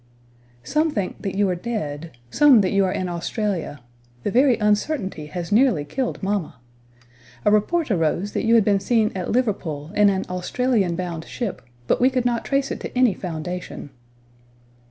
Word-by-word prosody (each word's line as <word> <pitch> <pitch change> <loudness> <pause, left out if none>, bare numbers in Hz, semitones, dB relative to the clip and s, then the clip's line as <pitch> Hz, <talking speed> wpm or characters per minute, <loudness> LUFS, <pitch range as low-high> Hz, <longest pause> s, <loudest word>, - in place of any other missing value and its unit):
"Some 310 - +1
think 205 -10 -3
that 195 -2 -4
you 205 0 +3
are 180 - 0
dead; 170 -7 -5 0.2
some 280 - +6
that 185 - 0
you 200 -1 +3
are 185 - 0
in 185 0 -2
Australia; 175 - -3 0.4
the - - -1
very 255 0 +4
uncertainty 210 - -1
has 175 +3 -6
nearly 215 - +3
killed 255 - -3
mamma. 195 -7 -1 0.9
A - - +5
report 270 +8 +1
arose 175 +3 0
that - - -2
you 230 +1 +4
had 225 -3 +5
been 200 -2 +3
seen 220 +1 +1
at 185 -2 -4
Liverpool, 180 - -1
in 210 -1 +5
an 190 -1 -1
Australian 190 +1 0
bound 170 -2 -4
ship, 235 -6 -4 0.2
but - - +1
we 255 - +6
could 255 -2 -1
not 240 -1 0
trace 275 0 0
it - - -4
to - - -7
any 250 -5 +4
foundation." 175 -3 -6
205 Hz, 175 wpm, -22 LUFS, 175-240 Hz, 0.9 s, some